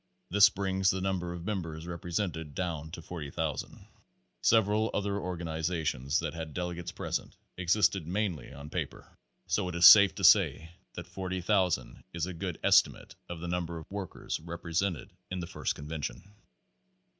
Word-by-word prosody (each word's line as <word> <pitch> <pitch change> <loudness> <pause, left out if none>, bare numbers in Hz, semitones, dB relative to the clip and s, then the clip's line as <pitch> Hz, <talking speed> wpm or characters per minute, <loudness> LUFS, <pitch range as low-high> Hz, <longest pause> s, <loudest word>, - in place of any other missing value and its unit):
This 100 +1 +7
brings 95 -1 0
the 95 - +1
number 95 -2 -2
of 85 0 -7
members 85 -6 -4
represented 85 -3 -4
down 80 -4 -3
to 85 - -7
40,000. 80 -2 -4 0.6
Several 110 0 +3
other 100 0 -1
organizations 80 -5 -2
that 80 -3 -3
had 80 -3 -7
delegates 90 -1 -4
pres - - -2
ent, - - -17 0.2
existed 90 -1 +2
mainly 95 -5 -2
on 70 +1 -10
paper; - - -5 0.3
so 90 +2 0
it 90 - -6
is 85 0 +5
safe 100 -1 +10
to - - -6
say 80 +1 +5 0.2
that - - -5
Page - - -23
FOVT 95 -2 -4
40,000 95 -4 +1
is 85 -1 -1
a 90 - -5
good 80 - -5
estimate - - +3 0.2
of 85 -2 -6
the 90 - -4
number 85 -1 -2
of 80 - -11
workers 100 -3 -4
represented 85 +3 -3 0.2
in 90 - -3
the 85 - -3
first - - -3
convention. 75 0 -5
85 Hz, 160 wpm, -30 LUFS, 80-95 Hz, 0.6 s, safe